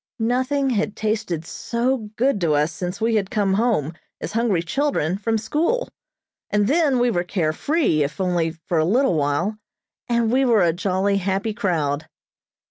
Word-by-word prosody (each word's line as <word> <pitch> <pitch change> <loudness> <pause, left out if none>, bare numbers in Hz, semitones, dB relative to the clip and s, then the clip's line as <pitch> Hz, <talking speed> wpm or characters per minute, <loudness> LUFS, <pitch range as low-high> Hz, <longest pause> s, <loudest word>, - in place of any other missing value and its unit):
Nothing 260 +4 0
had 210 -2 -1
tasted 210 -7 -2
so 235 +3 -2
good 250 -3 +1
to 165 -3 +2
us 150 +3 +1
since 180 +2 -5
we 225 +1 +1
had 200 -3 +1
come 205 -4 +1
home, 200 - +1 0.3
as - - -5
hungry 215 -6 +1
children, 190 - 0
from 225 +1 0
school. 320 - 0 0.6
As 210 0 +2
then, 285 +3 +2
we 245 0 +2
were 175 -4 0
care 170 -4 -1
free, 280 - +1
if 145 +5 -2
only 175 -3 +1
for 165 +1 -3
a - - +3
little 235 - +2
while, 160 +8 0 0.5
and 235 -1 +2
we 265 +2 +3
were 230 -7 +4
a 170 -1 +3
jolly, 190 +2 0
happy 195 +3 -1
crowd. 160 -9 -1
205 Hz, 170 wpm, -22 LUFS, 175-240 Hz, 0.6 s, were